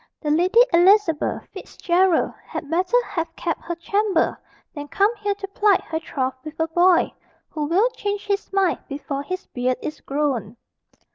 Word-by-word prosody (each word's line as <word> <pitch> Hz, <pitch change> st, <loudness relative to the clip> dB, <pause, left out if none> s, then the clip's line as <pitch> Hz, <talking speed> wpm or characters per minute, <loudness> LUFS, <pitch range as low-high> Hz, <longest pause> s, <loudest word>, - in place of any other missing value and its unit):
"The 300 Hz, -, -2 dB
Lady 365 Hz, +9 st, +4 dB
Elizabeth 350 Hz, -2 st, +3 dB
Fitzgerald 360 Hz, -1 st, +1 dB
had 295 Hz, -, -7 dB
better 365 Hz, +8 st, +2 dB
have 330 Hz, -1 st, -4 dB
kept 335 Hz, -2 st, -3 dB
her 345 Hz, -, -4 dB
chamber, 400 Hz, +1 st, 0 dB, 0.4 s
than 290 Hz, -1 st, -7 dB
come 405 Hz, +9 st, +2 dB
here 410 Hz, -1 st, -1 dB
to 395 Hz, 0 st, -7 dB
plight 405 Hz, -1 st, +3 dB
her 320 Hz, 0 st, -3 dB
troth 265 Hz, -5 st, -2 dB
with 310 Hz, 0 st, -9 dB
a 320 Hz, -, +1 dB
boy, 350 Hz, +2 st, +3 dB, 0.4 s
who 300 Hz, -1 st, -2 dB
will 365 Hz, +10 st, +3 dB
change 410 Hz, -3 st, -4 dB
his 400 Hz, 0 st, -2 dB
mind 390 Hz, -3 st, +1 dB
before 280 Hz, 0 st, -4 dB
his 370 Hz, +5 st, -5 dB
beard 250 Hz, 0 st, -1 dB
is 305 Hz, -, -6 dB
grown." 265 Hz, -7 st, -2 dB
340 Hz, 160 wpm, -22 LUFS, 300-395 Hz, 0.4 s, Lady